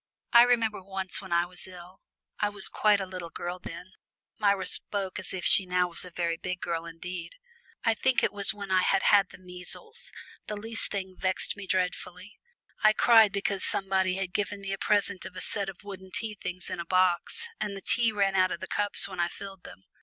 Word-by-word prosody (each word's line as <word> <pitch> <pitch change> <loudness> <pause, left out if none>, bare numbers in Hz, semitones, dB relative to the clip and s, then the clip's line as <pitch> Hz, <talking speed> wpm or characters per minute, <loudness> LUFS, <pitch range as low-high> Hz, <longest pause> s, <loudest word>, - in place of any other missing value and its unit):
I 235 - +10
remember 230 -4 +3
once 190 -1 -3
when 190 -2 -11
I 170 0 +3
was 180 +1 -5
ill 180 0 -12 0.4
I 210 - +2
was 205 -1 +2
quite 210 -1 +3
a 195 - -2
little 185 -2 -7
girl 175 +2 -5
then," 180 +1 -9 0.5
Myra 200 -3 +2
spoke 195 -1 0
as - - -4
if 185 -1 -4
she 190 - +6
was - - -15
now 180 -1 +2
a 180 +2 -4
very 170 -1 -2
big 180 +1 -4
girl 170 -1 -3
indeed! 170 - -7 0.5
"I 225 - +3
think 255 +3 +1
it - - +1
was 200 -1 +5
when 200 -3 -7
I 185 0 +4
had 195 +1 +2
had 200 -2 +5
the - - -13
measles, 185 - -5 0.4
the 210 - -4
least 225 +2 -3
thing 190 -2 -4
vexed 185 0 +2
me 200 -2 -8
dreadfully. 185 +2 -3 0.4
I 215 0 +6
cried 225 -2 +6
because 200 -1 -2
somebody 190 -1 0
had 190 -2 -3
given 205 0 -2
me 195 0 -5
a 195 - -4
present 200 -2 +1
of 185 - -9
a - - -5
set 200 -2 -3
of 190 0 -11
wooden 190 -2 -9
tea 225 0 -1
things 180 -3 -6
in - - -4
a 170 - -4
box, 185 - +1
and 200 -1 -3
the - - -8
tea 235 -2 +3
ran 200 -2 +1
out 185 -1 +3
of - - -3
the - - -5
cups 205 0 +1
when 190 -2 -8
I 175 - +2
filled 195 0 -9
them! 95 - -12
190 Hz, 220 wpm, -28 LUFS, 180-205 Hz, 0.5 s, I